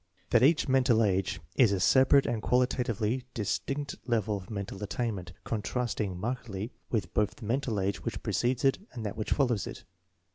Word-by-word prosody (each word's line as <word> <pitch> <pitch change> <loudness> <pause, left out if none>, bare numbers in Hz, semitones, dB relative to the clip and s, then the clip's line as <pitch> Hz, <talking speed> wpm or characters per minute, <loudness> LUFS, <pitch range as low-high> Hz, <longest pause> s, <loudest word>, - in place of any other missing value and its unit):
That 120 - +5
each 150 +5 +4
"mental 130 -4 +4
age' 95 -2 0 0.2
9 - - +9
is 105 - +2
a 100 - +1
separate 130 +9 +5
and 115 -2 -1
quali 125 +3 +3
tatively 120 -1 -1
distinct 135 +6 -2
level 110 -3 +1
of 95 +1 -8
mental 100 -2 -5
attainment, 105 -3 -3
contrast 120 +2 -2
ing 95 -4 -3
markedly 115 -1 -4 0.2
with 100 -7 -2
both 105 -1 +1
the 110 - -10
mental 120 -2 0
age 95 +1 -1
which - - -4
precedes 125 +2 0
it 135 - +3
and 115 -3 -6
that 105 - -3
which 110 - -4
follows 120 - +1
it. - - -8
115 Hz, 185 wpm, -29 LUFS, 100-125 Hz, 0.2 s, 9